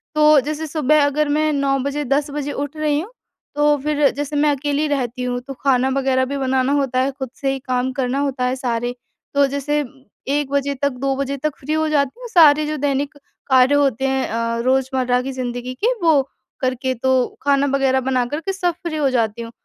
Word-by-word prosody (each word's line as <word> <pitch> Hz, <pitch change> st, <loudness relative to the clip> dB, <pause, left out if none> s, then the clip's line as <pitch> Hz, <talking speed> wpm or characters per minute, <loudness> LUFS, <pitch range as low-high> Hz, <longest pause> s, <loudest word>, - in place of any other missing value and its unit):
तो 305 Hz, -1 st, +6 dB
जैसे 305 Hz, +3 st, -4 dB
सुबह 300 Hz, -1 st, +3 dB
अगर 290 Hz, +1 st, 0 dB
मैं 305 Hz, +1 st, +2 dB
9 275 Hz, -1 st, +1 dB
बजे 280 Hz, +2 st, -2 dB
10 285 Hz, +3 st, 0 dB
बजे 290 Hz, 0 st, -3 dB
उठ 290 Hz, +2 st, -5 dB
रही 300 Hz, -1 st, +1 dB
हूँ 395 Hz, +9 st, -7 dB, 0.4 s
तो 295 Hz, 0 st, +3 dB
फिर 295 Hz, -2 st, +2 dB
जैसे 290 Hz, +1 st, -4 dB
मैं 295 Hz, +1 st, +3 dB
अकेली 290 Hz, +2 st, -1 dB
रहती 255 Hz, -3 st, -2 dB
हूँ 245 Hz, 0 st, -2 dB
तो 275 Hz, +2 st, -8 dB
खाना 260 Hz, -1 st, +1 dB
वग़ैरह 265 Hz, -1 st, +1 dB
भी 280 Hz, +2 st, -4 dB
बनाना 265 Hz, 0 st, +1 dB
होता 270 Hz, -3 st, +1 dB
है 270 Hz, +2 st, +1 dB
खुद 265 Hz, -2 st, -6 dB
से 270 Hz, -1 st, +1 dB
ही 270 Hz, -, -3 dB
काम 255 Hz, 0 st, 0 dB
करना 260 Hz, 0 st, -1 dB
होता 270 Hz, -3 st, -1 dB
है 255 Hz, +1 st, 0 dB
सारे। 245 Hz, -1 st, -2 dB, 0.4 s
तो 280 Hz, 0 st, +4 dB
जैसे 280 Hz, +2 st, -2 dB, 0.5 s
1 285 Hz, 0 st, 0 dB
बजे 280 Hz, 0 st, 0 dB
तक, 280 Hz, +2 st, 0 dB
2 270 Hz, +1 st, -2 dB
बजे 275 Hz, 0 st, -2 dB
तक 305 Hz, +1 st, -2 dB
फ़्री 300 Hz, +3 st, -3 dB
हो 315 Hz, 0 st, +1 dB
जाती 285 Hz, -, 0 dB
हूँ -, -, -7 dB
सारे 305 Hz, -6 st, +6 dB
जो 305 Hz, 0 st, -2 dB
दैनिक 280 Hz, +1 st, -1 dB, 0.4 s
कार्य 260 Hz, +2 st, +5 dB
होते 270 Hz, -2 st, +2 dB
हैं 265 Hz, 0 st, 0 dB
अ, 230 Hz, +1 st, -1 dB
रोज़मर्रा 260 Hz, -1 st, +1 dB
की 270 Hz, +1 st, -4 dB
जिंदगी 250 Hz, -1 st, -4 dB
के -, -, +3 dB
वो 315 Hz, -4 st, +5 dB, 0.4 s
करके 255 Hz, 0 st, -1 dB
तो 255 Hz, +1 st, 0 dB
खाना 280 Hz, 0 st, +3 dB
वगैरह 265 Hz, -1 st, +2 dB
बना 255 Hz, -2 st, +1 dB
कर 290 Hz, +5 st, -4 dB
के 390 Hz, +4 st, -3 dB
सब 355 Hz, -2 st, 0 dB
फ़्री 325 Hz, -3 st, -3 dB
हो 280 Hz, -3 st, +2 dB
जाती 230 Hz, -2 st, 0 dB
हूँ। 230 Hz, -, -7 dB
275 Hz, 215 wpm, -20 LUFS, 260-295 Hz, 0.5 s, तो